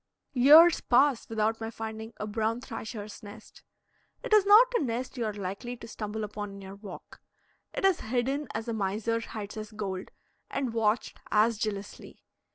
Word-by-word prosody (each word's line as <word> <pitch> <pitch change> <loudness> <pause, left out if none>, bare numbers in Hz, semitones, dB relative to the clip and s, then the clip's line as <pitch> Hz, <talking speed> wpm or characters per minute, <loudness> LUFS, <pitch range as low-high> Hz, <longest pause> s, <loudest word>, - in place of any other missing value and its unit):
Years 305 +6 +8
pass 260 0 +3
without 225 0 0
my 225 - -3
finding 220 0 -6
a 210 - -4
brown 220 +2 -1
thrasher's 220 -4 -7
nest; 210 +1 -13 0.6
it - - -2
is 415 -2 +6
not 470 +5 +7
a - - +3
nest 250 0 -3
you 240 -3 -2
are 215 - -2
likely 200 +5 -5
to 230 - -10
stumble 215 -1 -5
upon 205 0 -5
in 200 - -10
your 190 0 -9
walk; 200 -2 -11 0.5
it - - -2
is 385 -3 +4
hidden 260 +5 -1
as 220 +1 -3
a 230 - -2
miser 220 +2 -1
hides 215 -3 -7
his 215 0 -7
gold, 195 -3 -5 0.4
and 255 -4 -2
watched 225 0 0
as 215 +1 +3
jealously. 205 -2 -5
225 Hz, 170 wpm, -29 LUFS, 210-245 Hz, 0.6 s, Years